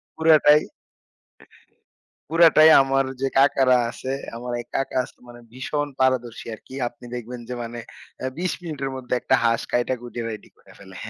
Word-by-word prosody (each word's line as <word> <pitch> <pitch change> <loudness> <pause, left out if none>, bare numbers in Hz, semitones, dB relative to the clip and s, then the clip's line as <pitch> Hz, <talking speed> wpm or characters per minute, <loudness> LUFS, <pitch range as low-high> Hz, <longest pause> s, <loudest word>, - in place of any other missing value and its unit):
পুরাটাই, 155 -2 +5 1.7
পুরাটাই 160 -1 +6
আমার 135 0 +1 0.2
যে 135 - +1
কাকারা 135 -2 +4
আছে, 130 +3 -6 0.2
আমার 125 +1 -6
এই 120 - -10
কাকা 135 -1 -1 0.3
মানে 120 0 -12
ভীষণ 145 +3 -3
পারদর্শী 125 -3 0
আরকি। 130 - -14
আপনি 120 - -19
দেখবেন 120 0 -7
যে 125 - -4
মানে 120 +1 -7 0.4
অ্যা 130 - -3
২০ 180 0 -1
মিনিটের 140 -5 -4
মধ্যে 125 -1 -3
একটা 130 - +1
হাঁস 115 0 +2
কাইটা 120 +1 +1
কুইটা 120 -1 -6
রেডি 110 -2 -9
করে - - -20
ফেলে। 95 -1 -13
130 Hz, 150 wpm, -23 LUFS, 120-145 Hz, 1.7 s, পুরাটাই